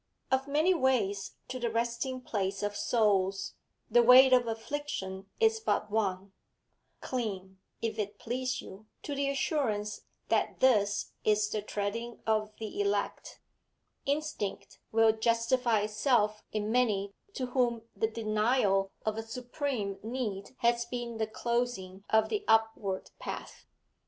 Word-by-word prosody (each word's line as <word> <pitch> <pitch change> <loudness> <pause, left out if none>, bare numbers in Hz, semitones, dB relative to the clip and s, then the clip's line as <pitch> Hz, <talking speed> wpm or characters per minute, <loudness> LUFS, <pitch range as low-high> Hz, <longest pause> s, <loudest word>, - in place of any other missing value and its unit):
Of 265 +1 +2
many 310 +6 +3
ways 230 - +1
to 255 0 -4
the 240 -1 0
resting 235 +3 -1
place 200 -4 -2
of 205 0 -1
souls, 195 -4 +1 0.3
the 240 +2 +5
way 255 +2 +8
of 250 -2 +5
affliction 225 -5 -4
is 445 0 +4
but 215 - 0
one; 195 -2 -1 0.7
cling, 190 -6 -4 0.2
if 225 -1 -2
it 205 0 -3
please 255 +3 -2
you, 205 +3 -12 0.2
to 290 - -4
the 280 0 0
assurance 230 -7 -1 0.3
that - - +1
this 210 -6 +3
is 210 0 +3
the 215 - -1
treading 215 +3 -3
of 215 -1 +1
the 225 - -4
elect, 400 0 -2 0.7
instinct 285 -8 -2
will 225 0 +5
justify 230 +1 +2
itself 215 0 +1
in 215 0 -1
many 210 -5 +1 0.2
to 255 - -1
whom 240 -3 +1
the 220 - +1
denial 215 -2 +2 0.2
of 215 0 0
a - - -1
supreme 240 -3 -3
need 220 -2 -4
has 235 0 +3
been 235 -1 -5
the 220 -1 0
closing 225 -5 -2
of 220 0 +4
the 415 -1 -1
upward 220 -4 +1
path. - - -7
225 Hz, 135 wpm, -31 LUFS, 205-250 Hz, 0.7 s, way